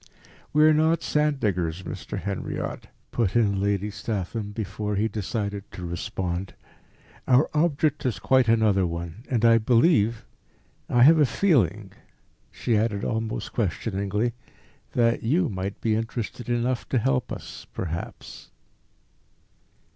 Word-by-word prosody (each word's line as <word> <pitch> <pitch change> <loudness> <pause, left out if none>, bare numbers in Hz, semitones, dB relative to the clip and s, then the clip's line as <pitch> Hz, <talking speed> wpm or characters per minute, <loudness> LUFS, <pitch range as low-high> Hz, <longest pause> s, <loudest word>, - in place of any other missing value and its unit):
"We 150 +1 +4
are 155 0 +7
not 160 +2 +2
sand 150 -2 +1
diggers, 90 -5 -1
Mr. - - -6
Henriot," 100 -1 -4 0.2
put 115 -5 0
in 100 -4 +2
Lady 100 +1 0
Statham, 105 0 -4
before 105 0 -3
he 105 +3 +1
decided 100 -1 -4
to 90 - -6
respond. 90 0 -4 0.7
"Our 130 +3 +4
object 150 -1 +1
is 120 - -1
quite 130 -2 +3
another 110 -5 +3
one; 85 +5 -6
and 120 -3 +1
I 115 0 +6
believe 115 - +3 0.6
I 120 0 +5
have 160 +4 +7
a 150 - +6
feeling," 145 - +1 0.6
she 115 - -1
added 105 -2 0
almost 110 0 -3
questioningly, 105 +2 -1 0.6
"that 115 -1 +2
you 160 +10 +1
might 95 0 -4
be 110 - +1
interested 115 +1 -4
enough 120 +1 -1
to 130 - +1
help 125 0 0
us - - -8
perhaps." 85 -1 -6
110 Hz, 130 wpm, -25 LUFS, 100-125 Hz, 0.7 s, are